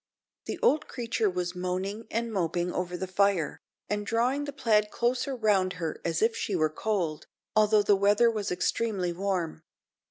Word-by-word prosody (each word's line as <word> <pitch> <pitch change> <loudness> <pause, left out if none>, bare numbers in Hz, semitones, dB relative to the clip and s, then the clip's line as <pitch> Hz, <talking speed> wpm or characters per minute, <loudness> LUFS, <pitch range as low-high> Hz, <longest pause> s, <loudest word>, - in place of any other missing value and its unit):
The - - -4
old 310 -10 +3
creature 230 -3 -1
was 180 -1 -2
moaning 185 +5 -3
and 230 0 -2
moping 175 -1 -1
over 180 0 -2
the 190 - -3
fire, 190 -3 +1 0.3
and 205 0 -1
drawing 245 +7 0
the 285 - -4
plaid 215 -6 +2
close 245 +4 0
round 210 -8 +1
her 165 -3 -4
as 165 +3 0
if 225 +1 +2
she 200 - -2
were 155 -3 +2
cold, 180 -6 -2 0.3
although 215 -1 +5
the 205 0 +4
weather 205 +4 +4
was 210 -4 -3
extremely 185 -1 0
warm. 180 -4 -2
200 Hz, 165 wpm, -28 LUFS, 180-225 Hz, 0.3 s, although